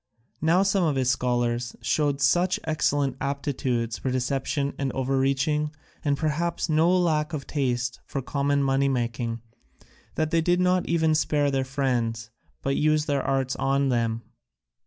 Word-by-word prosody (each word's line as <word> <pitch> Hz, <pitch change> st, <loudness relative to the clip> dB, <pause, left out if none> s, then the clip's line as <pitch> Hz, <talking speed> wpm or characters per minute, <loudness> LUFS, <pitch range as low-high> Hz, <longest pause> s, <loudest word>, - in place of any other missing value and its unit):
Now 170 Hz, +5 st, +4 dB
some 195 Hz, -1 st, +2 dB
of 155 Hz, -4 st, +1 dB
his 130 Hz, -1 st, +2 dB
scholars 120 Hz, -1 st, -1 dB
showed 145 Hz, -2 st, 0 dB
such 175 Hz, +7 st, +3 dB
excellent 145 Hz, -4 st, 0 dB
aptitudes 135 Hz, -4 st, -2 dB
for 130 Hz, -, -2 dB
deception 135 Hz, +3 st, -1 dB
and 135 Hz, -2 st, -1 dB
overreaching, 135 Hz, +3 st, 0 dB, 0.3 s
and 145 Hz, -1 st, +1 dB
perhaps 160 Hz, +3 st, -1 dB
no 160 Hz, +2 st, +3 dB
lack 165 Hz, -3 st, +1 dB
of 140 Hz, -3 st, -4 dB
taste 125 Hz, -4 st, -1 dB
for 140 Hz, -, -3 dB
common 140 Hz, +1 st, 0 dB
money 135 Hz, 0 st, +2 dB
making, 115 Hz, -2 st, -2 dB, 0.7 s
that 155 Hz, 0 st, 0 dB
they 165 Hz, -1 st, +3 dB
did 175 Hz, +2 st, +2 dB
not 180 Hz, 0 st, +2 dB
even 160 Hz, -1 st, +2 dB
spare 145 Hz, -1 st, +1 dB
their 135 Hz, -1 st, +1 dB
friends, 120 Hz, -5 st, -1 dB, 0.3 s
but 135 Hz, 0 st, 0 dB
used 155 Hz, 0 st, +2 dB
their 140 Hz, -2 st, 0 dB
arts 135 Hz, -1 st, 0 dB
on 135 Hz, 0 st, +1 dB
them. 115 Hz, -2 st, 0 dB
140 Hz, 150 wpm, -26 LUFS, 130-155 Hz, 0.7 s, Now